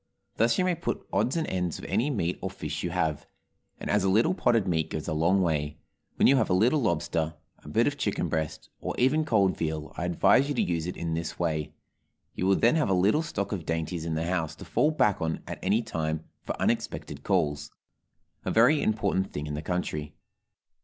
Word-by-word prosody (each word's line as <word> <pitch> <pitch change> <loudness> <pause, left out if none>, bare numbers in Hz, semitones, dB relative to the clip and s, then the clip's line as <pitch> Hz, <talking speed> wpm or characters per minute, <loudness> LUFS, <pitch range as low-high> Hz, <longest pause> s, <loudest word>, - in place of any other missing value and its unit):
Thus 115 +1 +3
you 185 - +2
may 180 - +2
pot 170 0 -3
odds 135 - +1
and 160 - 0
ends 90 -3 -2
of - - -9
any 130 +6 +1
meat 90 - -1
or 95 - -2
fish 75 -5 -5
you 90 - -2
have, 80 -4 -1 0.5
and - - -6
as - - +2
a 95 - +2
little 115 - +4
potted 115 - +2
meat 80 -3 0
goes 80 - -4
a - - -1
long 85 +5 +3
way, 75 -3 -1 0.4
when - - +4
you 135 - +6
have 110 - +1
a 90 - +3
little 120 +10 +4
lobster, 80 -5 0 0.3
a - - -10
bit - - +3
of - - -1
chicken - - 0
breast, 80 -1 -3
or - - -4
even 150 +5 +3
cold 100 -7 +3
veal, 80 -1 -3
I 90 - -2
advise 110 - +4
you 145 - -1
to - - +2
use 85 -1 -1
it 90 - -5
in 85 -1 -2
this 80 -1 -3
way; 80 -3 -2 0.6
you 90 - -1
will 95 - +5
then 120 +10 +3
have 150 - +1
a 95 - +3
little 100 - +3
stock 100 - -3
of 95 -5 -3
dainties 80 +1 -2
in 80 -1 -2
the 80 +1 -1
house 85 -3 -1
to - - -11
fall 150 - +2
back 105 -10 +2
on 80 0 -2
at - - -6
any 105 +5 +2
time 80 -6 -2 0.2
for - - -5
unexpected - - -2
calls 75 -7 0 0.7
a - - -2
very 125 +7 +5
important 100 -3 0
thing 75 - -4
in 75 - -5
the 75 - -3
country. 75 -3 -3
90 Hz, 220 wpm, -28 LUFS, 80-110 Hz, 0.7 s, you